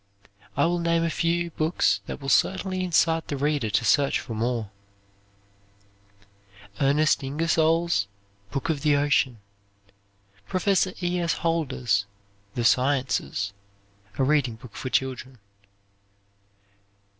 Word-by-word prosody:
I 145 Hz, -, +4 dB
will 175 Hz, +1 st, +1 dB
name 170 Hz, 0 st, +1 dB
a 165 Hz, -, 0 dB
few 170 Hz, +1 st, 0 dB
books 155 Hz, +2 st, +1 dB
that -, -, -5 dB
will 135 Hz, -, -8 dB
certainly 185 Hz, +6 st, +1 dB
incite 165 Hz, -2 st, +2 dB
the 145 Hz, -, -3 dB
reader 145 Hz, -4 st, 0 dB
to 110 Hz, -, +1 dB
search 140 Hz, +4 st, +3 dB
for 115 Hz, -, -7 dB
more: 115 Hz, -1 st, -2 dB, 2.1 s
Ernest 145 Hz, +2 st, +3 dB
Ingersoll's 160 Hz, -2 st, +1 dB, 0.4 s
"Book 135 Hz, +9 st, -3 dB
of 150 Hz, -3 st, -1 dB
the 150 Hz, -2 st, +3 dB
Ocean." 140 Hz, -4 st, +2 dB, 1.1 s
Professor 185 Hz, 0 st, +1 dB
E. 175 Hz, 0 st, 0 dB
S. 170 Hz, -2 st, +1 dB
Holder's 130 Hz, -11 st, 0 dB, 0.5 s
"The 120 Hz, -, -1 dB
Sciences," 130 Hz, -6 st, +1 dB, 0.6 s
a 135 Hz, -, +2 dB
reading 135 Hz, -4 st, +2 dB
book 120 Hz, -1 st, -14 dB
for 130 Hz, -, -5 dB
children. 130 Hz, 0 st, -2 dB
145 Hz, 115 wpm, -25 LUFS, 130-165 Hz, 2.1 s, I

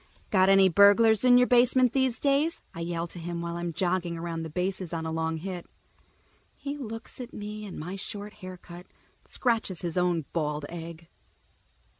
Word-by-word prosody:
"Got 190 Hz, -1 st, +4 dB
any 195 Hz, -1 st, +6 dB
burglars 205 Hz, +4 st, +6 dB
in 250 Hz, -1 st, +7 dB
your 250 Hz, -, +6 dB
basement 250 Hz, 0 st, +4 dB
these 260 Hz, -3 st, +1 dB
days?" 290 Hz, +4 st, +1 dB
I -, -, -8 dB
yell 170 Hz, 0 st, -2 dB
to 175 Hz, +1 st, -8 dB
him 170 Hz, 0 st, -4 dB
while 170 Hz, 0 st, -4 dB
I'm 175 Hz, 0 st, -3 dB
jogging 175 Hz, 0 st, -1 dB
around 165 Hz, 0 st, -4 dB
the 160 Hz, -, -5 dB
bases 180 Hz, +1 st, -3 dB
on 165 Hz, 0 st, -3 dB
a 160 Hz, -, -3 dB
long 160 Hz, 0 st, -1 dB
hit. 180 Hz, +1 st, -6 dB, 0.9 s
He 285 Hz, 0 st, -5 dB
looks 230 Hz, -3 st, -8 dB
at 245 Hz, -, -9 dB
me 210 Hz, 0 st, -6 dB
and 190 Hz, -, -8 dB
my 175 Hz, +5 st, -5 dB
short 205 Hz, +2 st, -6 dB
haircut 180 Hz, -2 st, -11 dB
and -, -, -34 dB
scratches 225 Hz, -7 st, 0 dB
his 175 Hz, +1 st, -1 dB
own 175 Hz, -4 st, +1 dB
bald 150 Hz, -2 st, -2 dB
egg. 165 Hz, -1 st, -8 dB
185 Hz, 180 wpm, -28 LUFS, 170-220 Hz, 0.9 s, in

